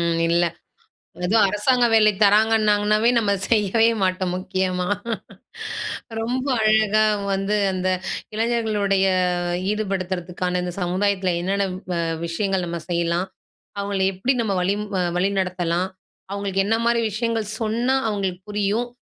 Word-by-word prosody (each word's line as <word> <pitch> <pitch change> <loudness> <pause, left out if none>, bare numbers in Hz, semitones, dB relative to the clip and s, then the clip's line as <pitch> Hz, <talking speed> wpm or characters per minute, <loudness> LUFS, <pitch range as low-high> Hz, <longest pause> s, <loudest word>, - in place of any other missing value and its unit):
ம். 170 -1 +1
இல்ல 170 +1 +3 0.8
அதுவும் 210 +3 +4
அரசாங்க 240 +5 +2
வேலை 215 -1 +6
தராங்கன்னாங்கன்னாவே, 215 +1 +4
நம்ம 210 -3 +2 0.2
செய்யவே 225 +1 +3
மாட்டோம் 185 -1 0
முக்கியமா. 185 -1 -1 1.3
ரொம்ப 250 +4 -2 0.2
அழகா 215 0 +4 0.3
வந்து 195 +2 0 0.2
அந்த 185 0 -1 0.5
இளைஞர்களுடைய 215 -4 +1 0.7
ஈடுபடுத்துறதுக்கான 185 -3 -2
இந்த 180 -1 -3
சமுதாயத்தில 185 0 0
என்னென்ன 195 +2 0 0.3
வ - - -1 0.3
விஷயங்கள் 190 +2 -1
நம்ம 170 -1 -4
செய்யலாம்? 170 +2 0 0.5
அவங்களை 200 -1 0
எப்படி 240 +9 0
நம்ம 200 -4 -1
வழிம் 200 +3 0
அ - - +2 0.2
வழிநடத்தலாம்? 185 -2 0 0.4
அவங்களுக்கு 195 -1 -1
என்ன 225 +2 +2
மாரி 235 0 +3
விஷயங்கள் 225 0 -1
சொன்னா? 235 +4 0
அவங்களுக்கு 195 -3 -2
புரியும். 210 +4 0
200 Hz, 115 wpm, -22 LUFS, 185-215 Hz, 1.3 s, வேலை